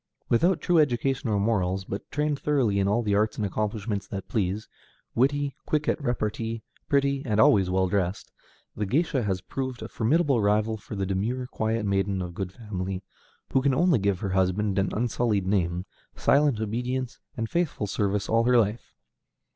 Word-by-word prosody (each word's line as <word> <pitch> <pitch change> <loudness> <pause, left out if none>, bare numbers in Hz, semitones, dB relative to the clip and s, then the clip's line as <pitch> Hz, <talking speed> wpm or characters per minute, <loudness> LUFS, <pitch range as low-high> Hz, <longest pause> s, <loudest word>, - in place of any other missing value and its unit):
Without 170 +9 +3
true 175 -2 +3
education 135 -3 +1
or 105 -2 +2
morals, 95 -3 0
but 100 +1 -6
trained 150 0 -1
thoroughly 125 -9 +1
in 100 - +2
all 110 +4 +2
the 105 -2 0
arts 105 +2 +1
and 105 - 0
accomplishments 105 0 -2
that 95 -1 -6
please, 105 0 -1 0.5
witty, 140 +3 +1
quick 150 -1 0
at 150 - +1
repartee, 115 -3 -2 0.3
pretty, 140 -1 +2
and 110 -6 0
always 100 -4 +5
well 95 0 +2
dressed, 95 0 -1 0.4
the 105 -1 -2
géisha 140 - +1
has 95 -3 -1
proved 130 -2 -4
a - - -5
formidable 135 +2 +2
rival 105 +2 +2
for 105 0 -8
the 100 -1 -1
demure, 110 +7 -1
quiet 110 -2 -1
maiden 100 -1 0
of 90 -1 -4
good 95 0 -4
family, 95 -3 -5 0.5
who 135 - +4
can 135 -1 +2
only 170 -4 +4
give 100 -2 0
her 100 - -1
husband 95 +2 +1
an 95 - +1
unsullied 115 -3 0
name, 90 -2 0 0.3
silent 140 -5 +3
obedience, 125 +4 -2 0.2
and 115 -1 -1
faithful 170 -7 -1
service 100 0 -1
all 115 +1 +2
her 125 0 +5
life. 110 0 0
110 Hz, 175 wpm, -26 LUFS, 100-130 Hz, 0.5 s, always